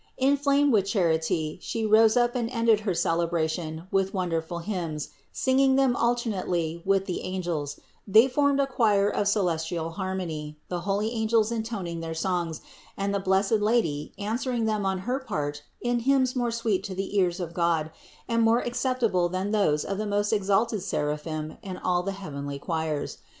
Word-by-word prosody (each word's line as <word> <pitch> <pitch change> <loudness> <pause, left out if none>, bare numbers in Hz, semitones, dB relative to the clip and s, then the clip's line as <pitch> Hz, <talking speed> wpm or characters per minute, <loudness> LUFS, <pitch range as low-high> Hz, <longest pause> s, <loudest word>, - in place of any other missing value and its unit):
Inflamed 280 +1 +3
with 200 -3 +3
charity, 160 -5 0
She 225 -1 -2
rose 220 +2 +5
up 240 0 +3
and 235 -2 -1
ended 230 -3 +3
her 210 -3 -1
cele 165 0 +1
bration 160 0 -2
with 195 0 +1
wonderful 170 -2 -2
hymns, 170 -5 -4 0.2
singing 265 0 +3
them 265 -2 +3
alternately 190 -9 -1
with 195 0 +2
the 185 -3 -3
angels; 170 -6 -3 0.3
they 220 +5 +7
formed 280 +1 +2
a 280 - +4
choir 215 -6 +2
of 205 0 0
celestial 170 -4 0
harmony, 165 -5 -4
the 180 - -2
holy 210 +3 +1
angels 220 -1 +2
intoning 220 -7 -3
their 165 0 -5
songs, 170 -2 -1 0.4
and 200 0 -1
the 200 - +1
blessed 195 +3 +2
Lady 210 -10 +1
answering 230 +3 -1
them 215 -2 0
on 190 0 0
her 255 +3 0
part 145 - -3 0.2
in 240 0 +1
hymns 260 +1 +2
more 245 -1 +1
sweet 225 -5 0
to 190 - -5
the 195 +2 -4
ears 180 -1 +1
of 170 -2 -4
God, 165 -2 +1 0.4
and 230 -1 +1
more 225 +1 +4
acceptable 240 -7 0
than 185 +3 -2
those 175 -9 +2
of 195 0 -3
the 215 - -2
most 205 +1 +1
exalted 210 +1 +1
seraphim 155 -2 -3
and 185 -2 -6
all 180 -1 +1
the 195 +2 -3
heavenly 145 -7 -6
choirs. 160 0 -3
195 Hz, 170 wpm, -27 LUFS, 170-230 Hz, 0.4 s, they